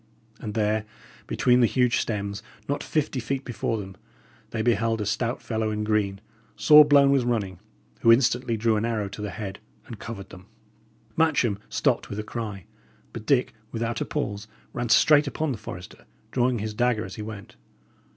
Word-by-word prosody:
And 105 -2 -6
there, 110 0 +1 0.4
between 125 0 +3
the 120 - +5
huge 125 +1 +2
stems, 100 -1 -3 0.3
not 145 - -1
fifty 150 -3 -1
feet 135 +3 -3
before 115 -1 -2
them, 95 -2 -7 0.5
they 110 -1 -2
beheld 115 -1 +1
a 105 - -2
stout 115 +4 -1
fellow 110 -1 -1
in 105 0 -2
green, 105 -2 0 0.4
sore 150 0 +8
blown 140 -1 +5
with 135 -2 +3
running, 105 -7 -1 0.4
who 115 - +5
instantly 120 0 +3
drew 110 0 +2
an 105 - -1
arrow 115 -3 -1
to 100 +1 -8
the 105 - -3
head 100 -1 -6 0.3
and 115 -4 -9
covered 105 -4 -7
them. 90 +2 -13 0.7
Matcham 135 -10 +2
stopped - - 0
with 100 - -5
a 105 - -3
cry; 105 -5 -6 0.5
but 110 -1 -8
Dick, 130 -3 +2 0.2
without 115 0 -2
a - - 0
pause, 105 +1 -3 0.3
ran 120 -1 -3
straight 150 +4 +6
upon 155 +1 -1
the 115 - -4
forester, 90 -4 -9 0.3
drawing 125 -1 +2
his 110 0 -4
dagger 120 -1 +1
as - - -8
he 110 - -7
went. 105 -2 -8
115 Hz, 180 wpm, -25 LUFS, 105-125 Hz, 0.7 s, sore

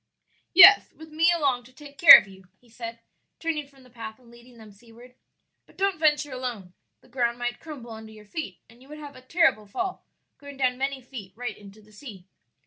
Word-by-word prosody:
"Yes, 390 +3 +8
with 320 0 -15
me 330 +3 +2
along 280 -7 -1
to 255 - -18
take 285 +1 -16
care 340 - +11
of - - -3
you," 190 -1 -17
he 245 - -27
said, 230 0 -9 0.4
turning 310 -3 -4
from 275 -2 -22
the 250 - -20
path 225 -2 -10
and 240 -2 -22
leading 240 +1 -19
them 220 -2 -15
seaward; 235 +4 -18 0.5
"but - - -24
don't 390 -2 -1
venture 295 -2 +1
alone, 240 -8 -7 0.3
the - - -24
ground 240 -1 -2
might 245 0 -5
crumble 275 -7 -11
under 220 0 -11
your 215 -1 -16
feet 205 - -7
and 235 +2 -22
you 265 - -19
would 300 - -10
have 290 -2 -11
a 255 - -14
terrible 260 -6 0
fall, 370 - -5 0.4
going 285 -1 -12
down 255 -2 0
many 270 -1 -4
feet 225 -7 -11
right 240 -2 -6
into 205 +1 -17
the 215 - -23
sea." 210 -5 -13
250 Hz, 215 wpm, -24 LUFS, 225-290 Hz, 0.5 s, care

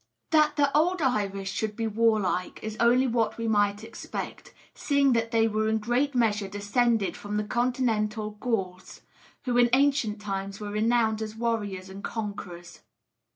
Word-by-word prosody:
That 305 -1 +4
the 285 -1 +2
old 350 +4 +3
Irish 200 -8 -1
should 215 0 -3
be 225 - -2
warlike 215 -4 +1
is 215 0 -4
only 245 +3 +4
what 230 -3 0
we 230 0 -3
might 205 -1 +1
expect; 225 +1 -7 0.2
seeing 280 -2 +2
that 230 -1 0
they 225 -1 +3
were 215 0 0
in 220 - +2
great 245 +6 0
measure 215 -4 +1
descended 205 +2 0
from 205 0 -4
the 210 - 0
Continental 220 -2 -1
Gauls, 195 -5 -4 0.4
who 245 -1 0
in 240 0 +5
ancient 265 -6 +2
times 195 -1 -4
were 205 -1 -5
renowned 220 0 +1
as 215 0 -5
warriors 210 -5 -2
and 195 +1 -10
conquerors. 200 -6 -6
220 Hz, 155 wpm, -27 LUFS, 205-240 Hz, 0.4 s, in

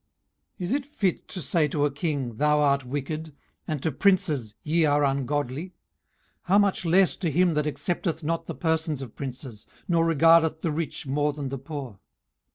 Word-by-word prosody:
18:034:018 - - -6
Is 175 - -2
it 280 -1 -1
fit 200 - -1
to 185 - -6
say 155 +3 +2
to 145 0 0
a 145 - 0
king, 140 -6 -3
Thou 150 +2 +3
art 140 -2 +3
wicked? 145 +3 -4 0.3
and 150 -4 -3
to 160 - +1
princes, 150 - +1
Ye 165 +2 +2
are 145 -1 +3
ungodly? 140 +1 -1
18:034:019 - - -21 0.7
How 190 +3 +4
much 200 -3 +2
less 185 +2 +4
to 175 - -1
him 175 +3 +3
that 150 0 0
accepteth 160 +2 -2
not 165 +2 -2
the - - -5
persons 160 -4 -1
of 120 - -10
princes, 130 -5 -7 0.2
nor 170 -2 +3
regardeth 165 0 +4
the 165 - -1
rich 160 0 -3
more 145 +2 0
than 140 -2 -5
the 135 0 -5
poor? 135 -7 -7
150 Hz, 185 wpm, -26 LUFS, 140-165 Hz, 0.7 s, How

